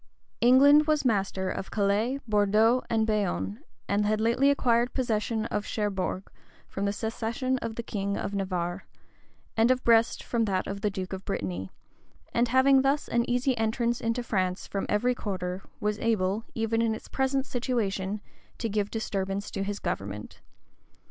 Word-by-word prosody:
England 285 +5 +6
was 305 -2 +2
master 195 -4 0
of 190 - -5
Calais, 215 +6 +1
Bordeaux, 215 +3 +3
and 225 -1 +2
Bayonne; 210 0 -1 0.3
had 210 +1 +1
lately 235 +5 +3
acquired 240 -3 +2
possession 225 -3 0
of 205 - -1
Cherbourg 195 -3 -2 0.4
from 195 - -3
the 200 - +1
cession 230 +4 -2
of 225 -2 -4
the 235 - -4
king 200 -2 -2
of 200 - -3
Navarre, 185 -2 -2 0.7
and 225 +2 +4
of 255 0 +2
Brest 230 -1 +3
from 230 -2 0
that 190 -3 0
of 200 0 -5
the 210 - +1
duke 190 -1 -5
of 190 0 -5
Brittany;[*] 95 - -3 0.6
and 235 +1 +3
having 260 +2 +5
thus 275 +2 +1
an 235 0 +1
easy 250 +1 +2
entrance 235 +2 0
into 230 +2 -1
France 185 -4 -1
from 195 - -3
every 245 +4 +2
quarter, 185 -5 -4 0.2
was 210 0 -1
able, 215 -1 0
even 225 0 0
in 225 -1 +1
its - - -10
present 265 0 0
situation, 215 -6 -2 0.4
to 230 - -2
give 205 -1 0
disturbance 200 -2 -3
to 195 - -3
his 200 +1 -2
government. 100 - -5
220 Hz, 160 wpm, -28 LUFS, 195-240 Hz, 0.7 s, England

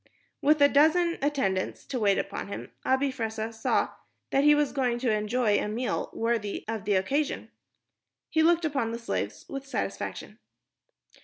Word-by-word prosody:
With 300 +2 +4
a - - +9
dozen 330 +4 +3
attendants 265 -10 -1
to 255 - -3
wait 200 -3 +3
upon 195 - -3
him, 200 - -7
Abi 265 +1 +2
Fressah 225 -2 -3
saw 225 - +1 0.4
that 275 - +3
he 295 0 +7
was 295 -1 +1
going 250 -4 0
to 240 -1 0
enjoy 215 0 +1
a - - -2
meal 235 +4 -2
worthy 225 -3 -2
of 220 -2 -4
the 205 - +2
occasion. 275 +11 -1 0.8
He 320 - +3
looked 335 +1 +4
upon 275 -7 -1
the - - -2
slaves 235 - -4
with 275 -1 -6
satisfaction. - - -4
250 Hz, 160 wpm, -28 LUFS, 220-290 Hz, 0.8 s, a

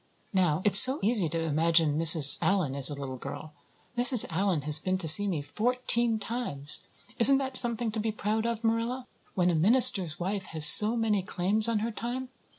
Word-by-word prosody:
Now, 180 -3 -3
it's 205 -1 +7
so 260 +2 +2
easy 205 -6 -2
to 165 +2 -7
imagine 160 0 -2
Mrs. 160 -3 +5
Allan 185 -9 -4
as 140 0 +4
a 145 - -8
little 135 -2 -11
girl. 140 +4 -12 0.4
Mrs. 245 -1 +4
Allan 180 -2 -4
has 150 +1 -2
been 185 +3 -5
to 180 -3 -6
see 205 +6 +7
me 165 -7 -6
fourteen 235 - -4
times. 200 - -2 0.3
Isn't 270 +3 +4
that 265 -1 0
something 235 -2 +1
to 220 - -8
be 220 +1 -5
proud 215 +2 -6
of, 235 -1 -8
Marilla? 230 +3 -5 0.3
When 180 -2 -2
a - - -6
minister's 190 - +3
wife 190 +2 -7
has 155 - +8
so 215 +9 +5
many 215 -3 -4
claims 205 +4 -4
on 230 - -4
her 235 - -7
time! 245 +3 -9
200 Hz, 190 wpm, -24 LUFS, 160-230 Hz, 0.4 s, has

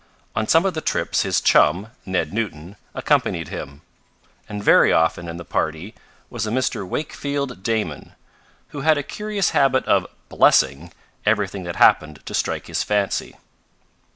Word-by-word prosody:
On 110 -1 -1
some 165 +3 +4
of 190 - +1
the 155 - -4
trips - - 0
his - - +1
chum, 90 +9 +3 0.2
Ned 95 0 -1
Newton, 100 -5 -4 0.2
accompanied - - 0
him, 70 +3 -8 0.7
and 105 -1 -5
very - - +5
often 80 +1 +1
in 85 0 -6
the 85 - -9
party 80 +10 -3 0.3
was 110 -3 -4
a - - -2
Mr. 115 -5 -1
Wakefield 140 -1 -4
Damon, 105 -9 -3 0.6
who 145 - -7
had 155 +1 +3
a 145 - -2
curious 210 +3 -2
habit 135 -1 +2
of - - +2 0.2
"blessing" 70 +6 +3 0.3
everything 105 -3 0
that 85 - -5
happened 75 -3 +3
to - - -7
strike - - -1
his - - -2
fancy. 105 -2 -1
105 Hz, 155 wpm, -21 LUFS, 85-135 Hz, 0.7 s, very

